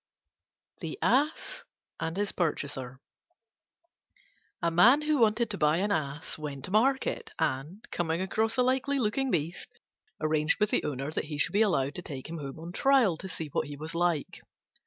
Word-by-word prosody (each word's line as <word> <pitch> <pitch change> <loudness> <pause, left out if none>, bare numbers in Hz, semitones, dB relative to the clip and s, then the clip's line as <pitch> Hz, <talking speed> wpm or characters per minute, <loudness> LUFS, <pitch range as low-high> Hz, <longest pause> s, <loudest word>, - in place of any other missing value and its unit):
THE - - -5
ASS 295 +4 +1 0.4
AND 165 +2 -3
HIS 205 0 0
PURCHASER 140 -6 -2 1.6
A 170 - +2
Man 240 - +6
who 300 -2 +2
wanted 225 0 +3
to 200 - -4
buy 150 +1 +3
an 205 +3 0
Ass 150 -2 -2
went 140 -3 -5
to - - -9
market, 270 - +1
and, 150 +11 -2
coming 165 -1 0
across 220 +5 0
a 250 - +4
likely 265 +2 +1
looking 260 +3 0
beast, 165 -3 -3 0.4
arranged 155 0 +1
with 210 0 +2
the - - +2
owner 140 0 -3
that - - -2
he 150 -1 -5
should 145 - +1
be 205 - +3
allowed 145 -10 +2
to 180 - -5
take 140 -6 -7
him 165 - -5
home 140 0 -6
on 165 +2 -7
trial 260 - +4
to 190 - -7
see 160 -4 -5
what 145 - -1
he 145 0 -7
was 155 +2 -6
like. 170 -3 0
175 Hz, 180 wpm, -29 LUFS, 150-225 Hz, 1.6 s, Man